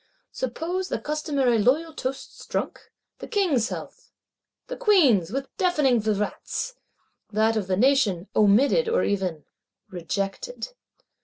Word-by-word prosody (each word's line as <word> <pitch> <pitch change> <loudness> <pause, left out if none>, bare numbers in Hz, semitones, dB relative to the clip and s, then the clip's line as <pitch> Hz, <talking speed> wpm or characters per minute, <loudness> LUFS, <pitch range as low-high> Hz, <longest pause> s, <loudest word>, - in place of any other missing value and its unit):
Suppose 340 +9 -3
the - - -1
customary 285 -6 0
loyal 300 +9 +2
toasts 265 +1 -6
drunk; - - -4 0.3
the - - -8
King's 330 - +1
health, - - -8 0.5
the - - -6
Queen's 295 - +4
with 270 +5 -5
deafening 295 -10 +2
vivats;—that 215 - -3
of 210 -4 -1
the 185 -1 0
Nation 215 -7 +2
"omitted," 255 - +4
or 470 - +2
even 185 -6 -2 0.5
"rejected." 195 - -4
255 Hz, 110 wpm, -25 LUFS, 205-325 Hz, 0.5 s, Queen's